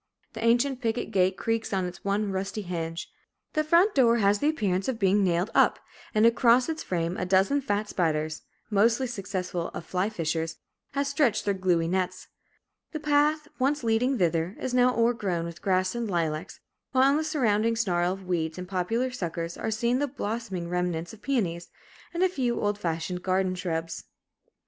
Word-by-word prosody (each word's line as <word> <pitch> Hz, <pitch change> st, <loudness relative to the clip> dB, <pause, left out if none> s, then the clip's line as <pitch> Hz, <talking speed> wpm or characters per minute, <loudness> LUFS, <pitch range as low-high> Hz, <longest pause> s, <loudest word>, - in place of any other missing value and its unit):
The 225 Hz, 0 st, -6 dB
ancient 245 Hz, +3 st, +2 dB
picket 230 Hz, 0 st, -1 dB
gate 185 Hz, 0 st, +2 dB
creaks 225 Hz, -1 st, -1 dB
on 190 Hz, -2 st, 0 dB
its 180 Hz, 0 st, -8 dB
one 200 Hz, +1 st, 0 dB
rusty 195 Hz, +2 st, -3 dB
hinge. 165 Hz, -2 st, -4 dB, 0.5 s
The 310 Hz, -, +1 dB
front 340 Hz, +7 st, +4 dB
door 235 Hz, -4 st, +4 dB
has 205 Hz, -1 st, +3 dB
the 295 Hz, -, +2 dB
appearance 195 Hz, -11 st, 0 dB
of 260 Hz, -3 st, -1 dB
being 200 Hz, 0 st, +3 dB
nailed 180 Hz, +3 st, +1 dB
up, -, -, +4 dB, 0.4 s
and 215 Hz, +1 st, +5 dB
across 235 Hz, +1 st, +5 dB
its 320 Hz, -1 st, -3 dB
frame 170 Hz, 0 st, -2 dB
a 180 Hz, -, -2 dB
dozen 195 Hz, +10 st, +3 dB
fat 210 Hz, -3 st, -1 dB
spiders, 155 Hz, -4 st, -1 dB, 0.3 s
most 215 Hz, +3 st, +4 dB
successful 190 Hz, -8 st, -3 dB
of 165 Hz, -, -6 dB
fly 185 Hz, +3 st, -1 dB
fishers, 165 Hz, -4 st, -2 dB, 0.4 s
have 280 Hz, 0 st, 0 dB
stretched 275 Hz, -6 st, +1 dB
their 200 Hz, -, +2 dB
gluey 180 Hz, -3 st, +1 dB
nets. 185 Hz, +1 st, -2 dB, 0.6 s
The 310 Hz, -, -3 dB
path, 300 Hz, 0 st, +2 dB
once 275 Hz, +2 st, +1 dB
leading 235 Hz, +4 st, +2 dB
thither, 170 Hz, 0 st, 0 dB
is 255 Hz, -, -3 dB
now 250 Hz, 0 st, +4 dB
o'ergrown 210 Hz, -8 st, +1 dB
with 170 Hz, 0 st, -8 dB
grass 185 Hz, -1 st, +1 dB
and 235 Hz, -2 st, -3 dB
lilacs, 165 Hz, -1 st, -2 dB, 0.3 s
while 265 Hz, +1 st, +5 dB
in 285 Hz, -, +2 dB
the 315 Hz, -, 0 dB
surrounding 230 Hz, -8 st, +1 dB
snarl 180 Hz, -5 st, +1 dB
of 190 Hz, 0 st, -6 dB
weeds 160 Hz, -3 st, -1 dB
and 180 Hz, 0 st, -6 dB
poplar 210 Hz, +8 st, -1 dB
suckers 170 Hz, -7 st, -4 dB
are -, -, -3 dB
seen 235 Hz, +3 st, +1 dB
the 290 Hz, -, +1 dB
blossoming 220 Hz, -8 st, -4 dB
remnants 175 Hz, -1 st, -2 dB
of 220 Hz, -, -14 dB
peonies, 185 Hz, -11 st, -1 dB, 0.4 s
and 345 Hz, +1 st, 0 dB
a -, -, +6 dB
few 255 Hz, -9 st, -1 dB
old 205 Hz, 0 st, -1 dB
fashioned 175 Hz, 0 st, -3 dB
garden 185 Hz, 0 st, +1 dB
shrubs. 165 Hz, -2 st, -4 dB
200 Hz, 180 wpm, -27 LUFS, 180-245 Hz, 0.6 s, a